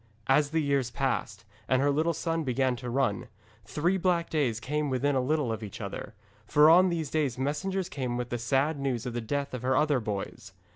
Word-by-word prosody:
As 140 +3 +3
the 160 +1 0
years 140 -3 +1
passed, 120 -6 -2 0.2
and 130 +1 +3
her 145 +1 +3
little 160 +3 +1
son 165 0 -1
began 130 -1 +1
to 125 0 -6
run, 125 -3 0 0.4
three 175 +5 0
black 175 -2 0
days 130 -8 0
came 150 +4 -2
within 135 +2 +1
a 130 - +2
little 145 -2 0
of 110 - -6
each 105 -3 -8
other, - - -6 0.3
for 150 +1 +6
on 185 +2 +6
these 160 -5 -2
days 145 -6 0
messengers 160 +8 -2
came 130 -8 -3
with 125 -1 -3
the 120 - -3
sad 140 +5 +1
news 130 -4 -2
of 125 - -4
the 120 - -2
death 140 +5 -3
of 125 - -4
her 130 +1 +1
other 150 -3 +3
boys. 105 -4 -5
140 Hz, 210 wpm, -28 LUFS, 125-155 Hz, 0.4 s, for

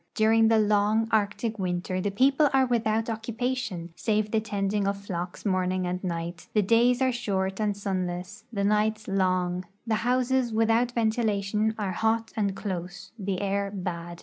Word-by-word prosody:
During 225 +1 +4
the 225 0 +4
long 210 +1 +3
Arctic 220 +1 0
winter 185 0 -2
the 205 - 0
people 270 +8 +3
are 265 -1 +5
without 225 -2 +1
occu])ation, 225 -5 -3
save 215 -1 0
the 220 - +3
tending 205 -1 -1
of 200 0 0
flocks 180 -2 -6
morning 185 -1 0
and 180 +1 -3
night; 170 -1 -4
the 210 - +4
days 240 +5 +3
are 260 - +3
short 195 -5 -2
and 210 -2 0
sunless 185 -1 -3
y*tlie 200 -3 -1
nights 215 +1 +1
long; 185 -2 0 0.2
the 225 - 0
houses, 250 0 +1
Avithout 225 +2 +2
ventilation, 220 -2 0
are 205 -3 -2
hot 225 +3 0
and 200 -3 0
close; 185 -1 -5
the 195 -1 -2
air 200 0 0
bad. 175 -3 -5
205 Hz, 160 wpm, -27 LUFS, 185-225 Hz, 0.2 s, are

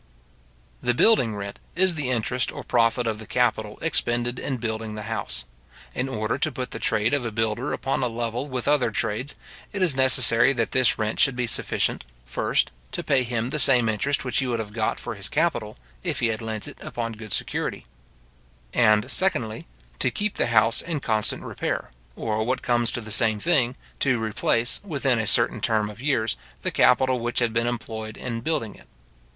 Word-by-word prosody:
The 120 - +1
building 125 - +4
rent 100 0 -6 0.2
is 185 +1 +3
the 150 -5 -2
interest 125 +1 0
or - - -8
profit 120 0 +2
of 110 -2 -2
the 110 - -10
capital 110 -4 0
expended 120 -6 0
in 135 - -3
building 110 -2 -4
the 105 - -6
house. 65 - -2 0.5
In 130 +2 -2
order 110 -3 -2
to 155 - +1
put 125 -1 -5
the - - -6
trade 105 +5 +1
of 145 -3 +1
a 115 - -3
builder 115 +4 -1
upon 135 - -1
a 125 - +1
level 120 +3 -3
with 130 -2 -3
other 145 -5 +3
trades, 110 +5 -2 0.4
it 195 -2 -1
is 165 -7 +3
necessary 130 -1 +6
that 115 -3 -1
this 130 -2 +3
rent 110 0 -2
should 135 - +4
be 125 0 -1
sufficient, 115 - 0 0.2
first, - - 0 0.2
to - - -3
pay 135 -2 +2
him 120 0 -2
the 150 - -1
same 125 -5 +7
interest 135 +7 0
which 125 - 0
he 135 - -1
would 120 -2 -1
have 105 -2 -6
got 110 -1 -1
for - - -5
his 100 -2 -5
capital, 155 -9 -1 0.2
if - - -3
he 120 - +1
had 110 0 -3
lent 110 -2 -4
it - - -11
upon 115 -1 -4
good 110 -1 -10
security; - - -2 0.9
and, 110 -3 +3
secondly, 115 - 0 0.3
to - - +3
keep 210 0 -2
the - - 0
house 115 0 +4
in 165 -3 -3
constant 110 -5 0
repair, - - -3 0.2
or, 110 -1 -1
what 125 +3 -2
comes 120 -1 +1
to 120 - -3
the 110 -1 -7
same 110 +1 +4
thing, 130 -4 +1 0.2
to 130 -3 +2
replace, 110 +2 0
within 140 - 0
a 110 - -1
certain - - +3
term 105 -2 +1
of 110 +3 -13
years, 130 -6 0 0.3
the - - -1
capital 130 -1 +3
which 120 +1 -3
had 120 -2 +2
been 115 0 +1
employed 110 -2 -5
in 115 -2 -4
building 120 -7 -2
it. - - -18
120 Hz, 195 wpm, -24 LUFS, 110-130 Hz, 0.9 s, same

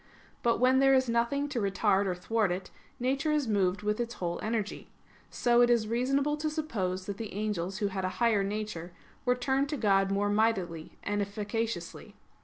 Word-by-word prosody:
But 235 -1 +2
when 255 +1 +4
there 270 0 +5
is 260 -1 +3
nothing 235 +5 +1
to 255 - -2
retard 200 0 +2
or 180 - -1
thwart 210 +2 0
it, 185 +1 -4 0.3
nature 270 +5 0
is 300 -4 +1
moved 200 -2 +1
with 210 +1 0
its 235 0 -3
whole 175 -1 -3
energy. 215 -1 -3 0.4
So 240 0 +3
it 240 - +5
is 235 -3 +3
reasonable 275 +6 +1
to 310 +1 -1
suppose 195 - -2
that 200 0 -5
the 225 -2 -6
angels 195 -3 -2
who 205 -2 0
had 190 -1 -3
a 185 - 0
higher 225 -4 +3
nature, 200 -4 -4 0.3
were 250 0 +3
turned 265 +3 0
to 300 - -2
God 195 -4 +3
more 205 +1 +1
mightily 195 -7 0
and 205 0 -1
efficaciously. 215 +3 -4
215 Hz, 190 wpm, -30 LUFS, 195-250 Hz, 0.4 s, there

